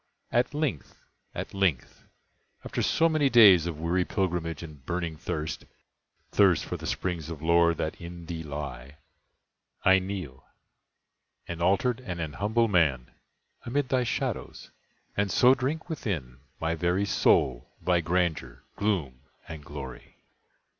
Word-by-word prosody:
At 125 +4 +1
length—at 145 - -5
length—after 95 -10 -4
so 165 - +3
many 155 -4 +2
days 100 -9 +7
Of 80 -3 -5
weary 85 +3 +1
pilgrimage 85 -4 -2
and 75 -5 -11
burning 85 +2 -3
thirst, 75 -1 -4 0.7
(Thirst - - +4
for - - -4
the - - -6
springs 85 -4 -3
of 80 -2 -7
lore 85 0 +4
that 80 +2 -4
in 85 0 -8
thee 85 -1 -5
lie,) 70 -3 -7 0.9
I 95 0 +7
kneel, 90 -9 -6 1.0
an 85 -1 -5
altered 100 +7 +2
and 90 -9 -6
an 80 -3 -4
humble 110 +7 +1
man, 80 - +2 0.5
Amid 130 +2 -1
thy 130 -1 +2
shadows, 120 - -4 0.4
and 100 0 +1
so 125 +6 +6
drink 140 +6 -2
within 85 - -4 0.2
My 80 0 0
very 90 +4 0
soul 65 -10 +2
thy 90 -1 +2
grandeur, 85 -1 -1
gloom, 85 -12 -1 0.3
and 80 -2 -8
glory! 70 -3 -9
85 Hz, 130 wpm, -28 LUFS, 80-100 Hz, 1.0 s, days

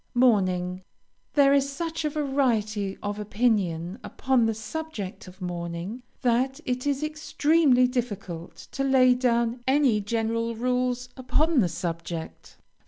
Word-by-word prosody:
MOURNING 185 -7 +2 0.5
There 280 -1 +5
is 275 0 +3
such 325 +3 -3
a 305 - +1
variety 235 -9 0
of 205 0 -3
opinion 200 -4 0
upon 255 -4 +1
the 225 - -1
subject 220 -4 -6
of 185 +1 -11
mourning, 175 +5 -4 0.2
that 255 +2 +1
it 255 +2 -2
is 285 +1 0
extremely 305 -3 +3
difficult 205 -9 -4 0.2
to 275 - -2
lay 260 -2 +5
down 235 -1 +1
any 265 -6 +3
general 230 +2 -1
rules 250 +1 -1
upon 300 +4 +1
the 185 -7 +3
subject. 170 -1 -5
240 Hz, 125 wpm, -26 LUFS, 200-270 Hz, 0.5 s, There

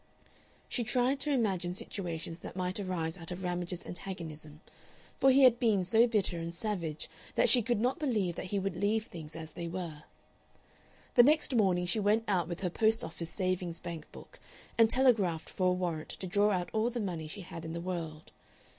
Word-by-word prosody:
She 240 - -1
tried 250 +3 +1
to 295 +2 0
imagine 190 -9 0
situations 170 -4 -5
that - - -9
might 185 +1 -2
arise 180 -3 -2
out 165 - -7
of 180 +1 -5
Ramage's 180 0 -2
antagonism, 160 -5 -7 0.6
for 270 - +6
he 270 +1 +6
had 245 -2 +7
been 215 -6 +3
so 225 +6 +5
bitter 200 -6 +1
and 165 0 -5
savage 170 -6 -3 0.3
that - - +4
she 250 - +7
could 235 0 0
not 250 +8 +1
believe 215 - 0
that - - -5
he 200 - -1
would 195 -2 -1
leave 210 +4 +1
things 155 -5 -9
as 160 -1 -7
they 170 +2 -5
were. 170 -4 -5 1.1
The 245 - +8
next 295 +2 +4
morning 190 -6 +3
she 190 +5 0
went 210 +2 +3
out 180 -5 +1
with 175 +1 -5
her 180 - 0
post 220 +4 +2
office 165 0 -5
savings 185 -3 -2
bank 165 -3 -7
book, - - -13 0.4
and 225 -1 +6
telegraphed 215 -11 +2
for 185 - +1
a 180 - +4
warrant 175 -4 -2
to - - -6
draw 205 +3 +3
out 180 -3 0
all 220 +2 +2
the 245 0 -4
money 175 -7 -3
she 195 +6 -7
had 165 -2 -8
in 160 0 -5
the 170 - -3
world. 165 -3 -5
185 Hz, 200 wpm, -32 LUFS, 170-220 Hz, 1.1 s, The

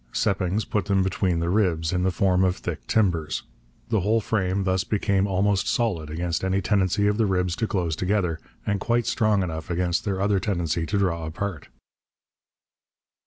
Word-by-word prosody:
Seppings 100 -1 0
put 105 -3 -1
them 100 -2 +2
between 95 -3 0
the 85 - 0
ribs, 90 -5 +1
in 90 - +1
the 95 - +2
form 95 0 +2
of 90 -1 +2
thick - - -6
timbers. 85 -8 +1 0.5
The 110 -2 +2
whole 105 +5 +2
frame 100 -3 0
thus 95 0 +1
became 100 -2 +1
almost 95 0 +1
solid 95 -11 0
against 85 +2 -2
any 95 +1 +1
tendency 100 0 +1
of 105 0 +2
the 110 -2 +2
ribs 90 -2 0
to 110 - 0
close 85 -6 -1
together, 90 -3 0 0.3
and 100 -1 0
quite 120 +4 +1
strong 105 -3 +2
enough 80 -2 -5
against 85 0 0
their 95 -2 -2
other 100 0 +2
tendency 85 -4 -1
to 100 - 0
draw 85 -5 0
apart. 90 -1 -4
95 Hz, 175 wpm, -25 LUFS, 85-100 Hz, 0.5 s, them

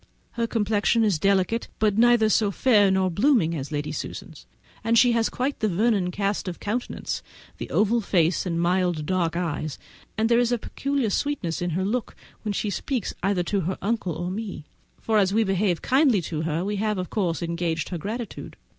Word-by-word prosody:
Her 235 -1 -1
complexion 220 +1 +1
is 200 -7 +2
delicate, 195 +5 +1
but 210 -2 +2
neither 235 0 +5
so 215 -1 +3
fair 205 -1 +4
nor 190 -1 +2
so - - -8
blooming 205 - +3
as 140 -1 -5
Lady 145 0 -2
Susan's, - - -7 0.4
and 230 +1 +2
she 245 +1 +6
has 230 -1 +2
quite 270 +3 -2
the 215 - +1
Vernon 200 -1 +1
cast 200 +1 -2
of 180 - -5
countenance, 235 +4 -3 0.4
the - - -5
oval 225 +3 +2
face 175 -2 +1
and 170 -1 -1
mild 175 -2 +1
dark 170 -1 0
eyes, 155 -4 -3 0.4
and 220 +1 +2
there 235 0 +4
is 245 -1 +2
peculiar 275 -2 -2
sweetness 200 - -1
in 175 - -1
her 190 - 0
look 235 +4 -2 0.3
when 215 - -2
she 205 +1 -2
speaks 250 0 -2
either 190 -1 +1
to 195 +3 -1
her 185 +3 -2
uncle 205 -5 -1
or 175 +2 -3
me, 200 -6 -5 0.3
for 220 -1 +2
as 195 0 +2
we 225 - +4
behave 195 -3 0
kindly 260 - +3
to 155 -1 -3
her 165 +2 -1
we 205 +1 -2
have 210 0 0
of 180 -1 -4
course 175 -5 -1
engaged 170 -2 -2
her 175 - -4
gratitude. 225 +6 -6
200 Hz, 195 wpm, -25 LUFS, 175-225 Hz, 0.4 s, she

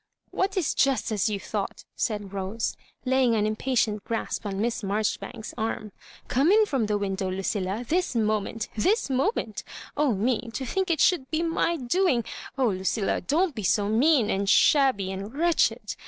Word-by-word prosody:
"What 390 +1 -1
is 355 - +1
just 270 -4 +1
as 215 +1 +1
you 205 -2 -2
thought?" - - -4
said 205 -4 -2
Rose, 195 +3 -2 0.3
laying 255 -2 +3
an 210 -1 +1
impatient 215 -1 0
grasp 225 -1 -3
on 195 -1 -3
Miss 230 +1 -1
Marjoribanks's 215 +2 -3
arm. 220 -1 -3 0.2
" - - -21
Come 280 +8 +3
in 430 +1 +6
from 265 - 0
the 210 -1 +1
window, 195 -1 -2
Lucilla, 195 +3 -2
this 355 -3 0
moment 215 0 0
— - - -27
this 365 - +1
moment! 260 - -1 0.3
Oh, 290 -6 +2
me, 235 +3 0
to 265 - -3
think 380 +9 -1
it 325 -3 +1
should 280 -8 +3
be 320 +1 0
my 335 0 0
doing! 265 -1 +1 0.3
Oh, 260 -3 +3
Lucilla, 190 +1 -1
don^t 320 - +1
be 220 - -5
so 205 +1 +1
mean 250 +1 +3
and 195 0 0
shabby 260 -11 +4
and 200 +6 -6
wretched. 340 +1 +1
230 Hz, 175 wpm, -26 LUFS, 205-285 Hz, 0.3 s, in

